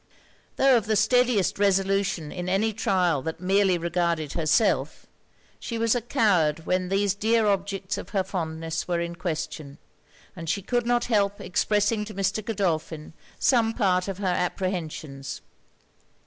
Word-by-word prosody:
Tho' 270 -2 +5
of 220 -3 -2
the 220 - +2
steadiest 220 -2 +2
resolution 195 -5 +1
in 180 0 -4
any 215 +4 +1
trial 180 -8 +1
that 160 +4 -5
merely 190 0 +2
regarded 170 -3 -1
herself, 165 +6 +1 0.5
she 230 - -5
was 230 0 +2
a 245 - 0
coward 180 - +1
when 185 0 0
these 195 0 +1
dear 220 +2 +2
objects 195 -1 -1
of - - -9
her 195 -3 0
fondness 165 -3 -4
were 175 -1 0
in 170 0 -3
question; 155 -4 -5 0.6
and 165 -3 -6
she 200 +3 -1
could 240 +3 -1
not 240 0 +2
help 205 -3 +1
expressing 210 +3 +1
to 215 - -9
Mr. 195 +2 -1
Godolphin 165 -7 -2 0.2
some 230 -3 +2
part 185 -5 +1
of 195 -2 -4
her 200 - -5
apprehensions. 175 -6 -3
195 Hz, 150 wpm, -25 LUFS, 170-210 Hz, 0.6 s, Tho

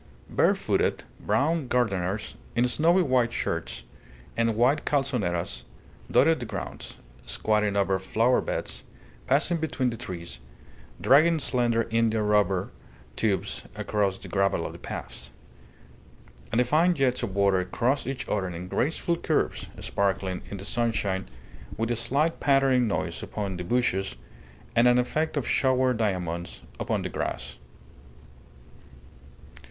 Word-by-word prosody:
Barefooted, - - +2 0.2
brown 155 0 +1
gardeners, 105 -5 0 0.2
in 120 +1 +3
snowy 170 +8 +3
white 130 -5 +2
shirts - - -3 0.5
and 115 -1 +1
wide 125 +6 +3
calzoneras, 100 - -1 0.5
dotted 165 -2 +4
the 120 - -5
grounds, - - -6 0.3
squatting 105 -2 +1
over 95 -1 +2
flowerbeds, 115 +6 0 0.5
passing 150 +6 +3
between 135 -6 -1
the 115 - -6
trees, 85 - -7 0.6
dragging 155 +5 +5
slender 120 -5 +1
India 115 -1 +2
rubber 105 -3 +2 0.4
tubes 105 -4 -1
across 100 -3 0
the - - -10
gravel 100 -4 +1
of - - -5
the - - -11
paths; 60 - -6 1.2
and 115 - +2
the - - +6
fine 160 +8 +3
jets 135 -4 +1
of 105 -6 -3
water 100 -2 +3
crossed 125 +8 0
each 135 -1 -4
other 100 -3 0
in 90 0 -6
graceful 160 - 0
curves, - - -1
sparkling 95 -2 -1
in 100 - -5
the 100 - -8
sunshine 105 -5 -1 0.5
with 115 +1 -1
a - - +1
slight 140 +8 0
pattering 135 -3 +3
noise 100 - -2
upon 100 -3 -4
the 90 - -4
bushes, 95 - 0 0.6
and 115 +1 +5
an 125 0 +5
effect 155 +6 0
of 135 - -1
showered 130 -2 +2
diamonds 90 -5 -2 0.2
upon - - -1
the - - -3
grass. - - -4
115 Hz, 130 wpm, -27 LUFS, 95-130 Hz, 1.2 s, the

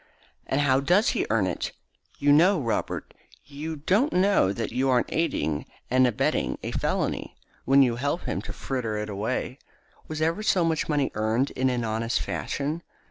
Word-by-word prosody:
"And 135 - +1
how 135 -2 +3
does 180 - +3
he - - 0
earn 110 -3 +2
it? 90 - -3 0.4
You 145 - +1
don't 145 - +7
know, 185 +2 +4
Robert. 115 -5 -2 0.3
You 150 +3 -6
don't 200 - +1
know 185 - +3
that 110 +2 -3
you 130 +3 +1
aren't 125 -2 +1
aiding 140 - -1 0.2
and 130 0 +5
abetting 120 - 0
a - - -3
felony - - -2 0.3
when 135 +1 +6
you 120 -2 +1
help 145 +7 -1
him 95 - -2
to 105 - -7
fritter 115 -1 -3
it 105 0 -3
away. 110 +6 -3 0.5
Was 155 -1 -5
ever 165 +6 0
so 185 -5 +2
much 160 -1 0
money 145 -3 +1
earned 110 +5 0
in 130 0 0
an 125 -2 -1
honest 115 +1 -1
fashion? 150 +4 -3
135 Hz, 180 wpm, -26 LUFS, 115-155 Hz, 0.5 s, don't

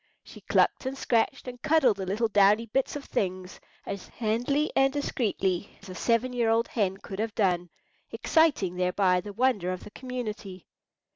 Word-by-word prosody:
She - - -13
clucked - - +1
and 270 +1 -4
scratched, 245 +2 0
and 245 -1 -8
cuddled 300 -9 +3
the 190 -1 -5
little 215 +5 0
downy 205 +2 +4
bits 265 +6 -1
of 285 - -6
things 185 -1 -3 0.3
as 200 -2 -6
handily 245 +7 -1
and 270 0 +4
discreetly 205 -9 -2
as - - -13
a - - -6
seven 235 +6 0
year 235 -2 +1
old 225 +1 +2
hen 195 -4 0
could 195 0 -8
have 220 -1 -2
done, 180 -4 +1 0.4
exciting 280 - +2
thereby 180 0 +2
the 205 +2 -8
wonder 205 -5 +1
of 185 - -5
the - - -11
community. 215 -8 -6
215 Hz, 170 wpm, -27 LUFS, 190-255 Hz, 0.4 s, downy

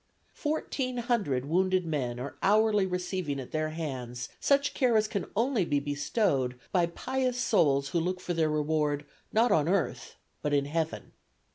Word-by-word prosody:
Fourteen 275 -5 -2
hundred 210 - 0
wounded 185 +3 +2
men 130 -7 -2
are 135 +3 -6
hourly 210 -1 +4
receiving 180 -5 -2
at 130 - -8
their 155 0 -1
hands 130 -6 -5
such 280 0 +2
care 245 -4 +3
as 215 0 +2
can 200 -3 -3
only 230 -1 +2
be 145 -4 +1
bestowed 145 - 0
by 175 -3 +3
pious 255 +7 -2
souls 140 - +3
who 170 - +1
look 180 +2 -1
for 180 - -3
their 160 -2 +2
reward 150 -1 0 0.3
not 230 +2 +3
on 155 +1 +3
earth 190 -2 -1 0.3
but 150 - -1
in 140 -1 +3
heaven. 160 +2 -3
170 Hz, 160 wpm, -29 LUFS, 145-215 Hz, 0.3 s, hourly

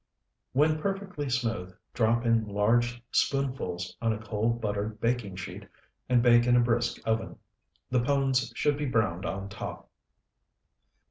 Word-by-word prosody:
When 155 +3 +3
perfectly 195 -7 -3
smooth, 115 -8 -2 0.2
drop 115 0 +2
in 115 -2 +2
large 120 +4 +1
spoonfuls 110 -11 -1
on 115 -1 +2
a - - -3
cold 110 +2 -1
buttered 105 0 -3
baking 115 -5 -1
sheet 90 -2 -7 0.4
and 125 -2 +4
bake 120 -1 +6
in 120 - +5
a - - +6
brisk 120 0 +1
oven. 110 0 -1 0.5
The 125 -1 +3
pones 135 -2 +1
should 145 +3 +1
be 145 - -1
browned 100 -7 0
on 100 +1 -4
top. 100 +3 -7
120 Hz, 140 wpm, -28 LUFS, 105-125 Hz, 0.5 s, bake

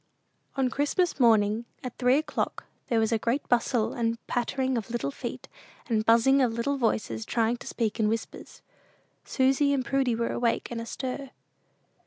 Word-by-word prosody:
On 265 -2 +1
Christmas 295 +4 0
morning, 220 -2 +4 0.2
at 250 -2 -6
three 250 +1 +4
o'clock, 310 - -2 0.2
there 230 - +2
was 220 0 +1
a 225 - +2
great 240 +6 -1
bustle 235 -1 +1
and 230 -1 -1
pattering 260 +2 -1
of 225 -3 -3
little 240 +4 -2
feet, - - -7 0.4
and 220 -3 0
buzzing 235 +5 +5
of 245 -3 +2
little 235 +5 -1
voices 220 - -1
trying 230 - 0
to - - -11
speak 225 -1 -2
in 215 - +3
whispers. 225 +1 -5 0.6
Susy 270 +2 +2
and 265 -2 0
Prudy 265 -3 +1
were 230 0 -1
awake 235 0 -1
and 230 -1 -3
astir. 260 +3 -5
240 Hz, 165 wpm, -27 LUFS, 230-265 Hz, 0.6 s, buzzing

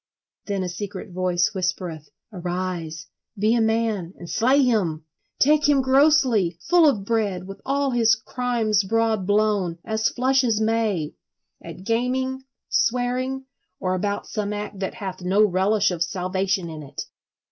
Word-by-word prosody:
Then 200 -2 -1
a - - -2
secret 190 +1 -6
voice 180 +2 +1
whispereth: 180 -5 -3 0.2
"Arise, 175 -3 -4 0.3
be 215 +3 +2
a 235 - +2
man, 220 -5 0
and 175 - -9
slay 260 +9 +3
him! 180 -11 0 0.3
Take 295 +1 +4
him 275 -2 +4
grossly, 260 - +3
full 345 -3 +6
of 205 -8 -2
bread, 205 -5 -1
with 195 +1 -10
all 275 0 +1
his 230 -2 +4
crimes 225 -2 0
broad 220 -1 0
blown, 205 -4 +1
as 220 -1 +1
flush 260 +2 +2
as 225 -3 +1
May; 220 -8 0 0.5
At 170 +2 -9
gaming, 260 +4 -1 0.2
swearing, 255 +2 0 0.3
or 185 0 -1
about 200 +2 -2
some 210 -1 -3
act 205 -1 -5
That 190 - -3
hath 190 -3 -6
no 190 +4 +3
relish 200 +2 +2
of 175 -2 -4
salvation 185 +1 -1
in 160 -2 -7
it!" 140 -1 -7
210 Hz, 145 wpm, -23 LUFS, 185-240 Hz, 0.5 s, full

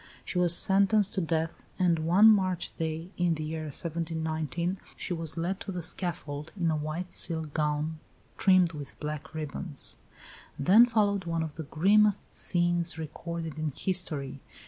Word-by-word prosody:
She 180 - -2
was 175 -1 +4
sentenced 200 +1 +3
to 190 - 0
death; 165 -1 -2
and 175 -3 +2
one 175 +7 +6
March 185 -5 +3
day, 160 +2 -3
in 175 -2 +2
the 155 - -4
year 155 0 -4
1719, 160 +2 -2 0.2
she - - -3
was 165 -1 -4
led 180 +4 -1
to 200 - -5
the 180 -2 -4
scaffold 155 -4 -4
"in 170 -2 +2
a - - +1
white 155 +4 -4
silk 160 -3 -2
gown 150 +1 -1 0.4
trimmed 185 -3 +4
with 145 -2 -9
black 150 +1 -5
ribbons." 155 0 -3 0.6
Then 200 - +6
followed 205 -5 +1
one 165 -1 -1
of 160 -2 -5
the 160 - -6
grimmest 205 +5 +3
scenes 175 -1 +1
recorded 160 0 -5
in 155 -2 -2
history. 150 -8 -1
165 Hz, 155 wpm, -29 LUFS, 155-185 Hz, 0.6 s, one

